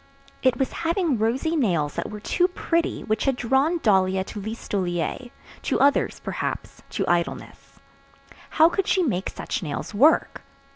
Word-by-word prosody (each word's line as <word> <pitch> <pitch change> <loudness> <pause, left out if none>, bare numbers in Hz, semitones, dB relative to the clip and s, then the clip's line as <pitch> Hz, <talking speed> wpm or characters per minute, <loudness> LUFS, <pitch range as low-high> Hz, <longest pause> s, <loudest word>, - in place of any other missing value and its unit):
It 255 -2 +3
was 265 - 0
having 335 - 0
rosy 255 +9 0
nails 170 - +1
that - - -4
were 210 - -7
too 355 - +1
pretty 335 -2 -1
which 215 0 -1
had 270 -2 +2
drawn 265 +8 +2
Dahlia 190 -3 +3
to 205 +2 -8
Listolier, 200 +1 -3 0.3
to - - 0
others 280 +1 +2
perhaps, - - -4
to - - -2
idleness. 175 -1 -2 0.8
How 315 +1 +8
could 370 +2 -1
she 375 - +3
make 195 - -1
such - - -4
nails 150 +4 -5
work? 285 +10 +3
240 Hz, 150 wpm, -24 LUFS, 190-320 Hz, 0.8 s, How